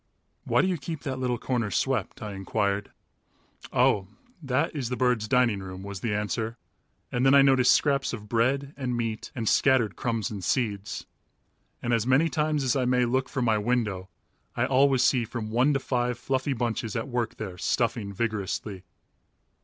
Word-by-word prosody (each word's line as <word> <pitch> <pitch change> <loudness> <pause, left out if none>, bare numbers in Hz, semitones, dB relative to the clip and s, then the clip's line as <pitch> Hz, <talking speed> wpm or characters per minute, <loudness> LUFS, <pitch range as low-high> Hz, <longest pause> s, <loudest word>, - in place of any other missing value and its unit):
"Why - - +3
do - - +2
you 180 -4 -1
keep 155 +2 -6
that 130 -3 -3
little 125 -1 0
corner 120 -3 -1
swept?" 100 - -1
I 105 -1 -5
inquired. 100 +1 -1 0.8
"Oh, 95 -2 +3 0.3
that 140 +3 0
is 130 -5 -2
the 125 - -1
birds' 125 -4 +1
dining 125 -4 +3
room," 95 0 -8
was 100 -1 -6
the 110 - -2
answer, 110 +2 -2 0.5
and 125 - 0
then 135 +1 +6
I 140 - +8
noticed 130 -2 +5
scraps 140 -1 +2
of 105 -3 -7
bread 135 +6 +1
and 125 -3 -2
meat 115 -2 -3
and 115 -3 -3
scattered 130 -4 +3
crumbs 115 -4 -2
and 100 -3 -6
seeds. 105 -2 -1 0.8
And 120 - 0
as 115 0 +1
many 135 +6 +4
times 150 -2 0
as 130 -3 +1
I 130 -2 +1
may 125 0 +3
look 130 +2 0
from 130 -2 -1
my 110 -2 +3
windows 105 -5 -1 0.5
I - - +1
always 135 -1 +3
see 125 -2 +3
from 110 -1 -5
one 125 +6 +3
to - - +2
five 125 -2 -1
fluffy 130 +2 -1
bunches 115 -2 -2
at 115 +2 -2
work 120 -3 -2
there 95 -4 -7
stuffing 115 -2 0
vigorously. 105 -2 -3
120 Hz, 180 wpm, -27 LUFS, 110-130 Hz, 0.8 s, I